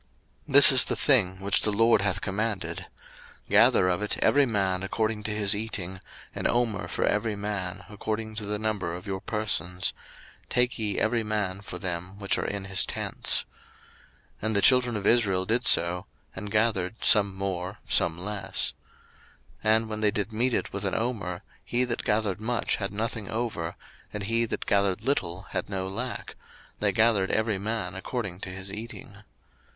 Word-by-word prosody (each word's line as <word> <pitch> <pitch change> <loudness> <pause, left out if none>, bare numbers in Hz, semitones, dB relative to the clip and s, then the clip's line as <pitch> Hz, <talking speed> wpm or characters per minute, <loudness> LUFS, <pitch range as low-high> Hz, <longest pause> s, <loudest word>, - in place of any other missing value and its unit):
02:016:016 140 - -8
This 140 0 +10
is 130 -1 +4
the - - 0
thing 95 -10 +3
which 100 +1 +2
the - - +1
LORD 115 +1 +4
hath 100 -2 0
commanded, 95 -4 -3 0.6
Gather 90 - +5
of 90 +2 0
it 105 - -1
every 145 -1 +4
man 95 -4 0
according 110 +2 -1
to 105 - -2
his 105 -1 +2
eating, 95 -4 -4 0.3
an - - -1
omer 120 -4 0
for - - -1
every 110 -2 0
man, 100 -3 -4
according 110 +1 -4
to 105 -2 -4
the 105 0 0
number 105 -5 -2
of 90 - -9
your 95 -1 -3
persons; 95 -5 -1 0.6
take 125 0 +1
ye 105 -2 -1
every 115 +1 +1
man 105 -3 -2
for 100 - -7
them 90 +1 -4
which 100 -1 0
are - - -2
in 100 -1 -3
his 95 -1 +2
tents. - - -1 1.0
02:016:017 110 - -1
And 110 - 0
the 100 - +4
children 125 -3 +5
of 100 - -5
Israel 100 -6 +3
did 120 +4 +1
so, 90 +2 +3 0.3
and 105 - -6
gathered, 105 -2 0
some 100 -3 +5
more, 95 0 -3
some 80 - +2
less. 100 +1 -1 0.9
02:016:018 110 0 +4
And 110 0 0
when 110 0 -3
they 105 - +4
did 105 +1 -2
mete 120 +3 +1
it - - -2
with 100 0 -4
an 95 - -1
omer, 110 -7 -3 0.2
he 120 +1 +1
that 120 -2 -2
gathered 105 -2 0
much 120 +2 0
had 100 -2 -3
nothing 110 0 -3
over, 110 -8 -3 0.4
and 105 - -5
he 115 +3 +1
that - - -4
gathered 100 -2 +1
little 95 -10 -1
had - - -3
no 95 -1 -2
lack; 120 +6 -5 0.4
they - - +2
gathered 110 -4 +3
every 110 -3 0
man 105 -3 -3
according 95 -2 -5
to 95 - -6
his 95 +1 -4
eating. 105 -2 -8
105 Hz, 180 wpm, -27 LUFS, 95-110 Hz, 1.0 s, This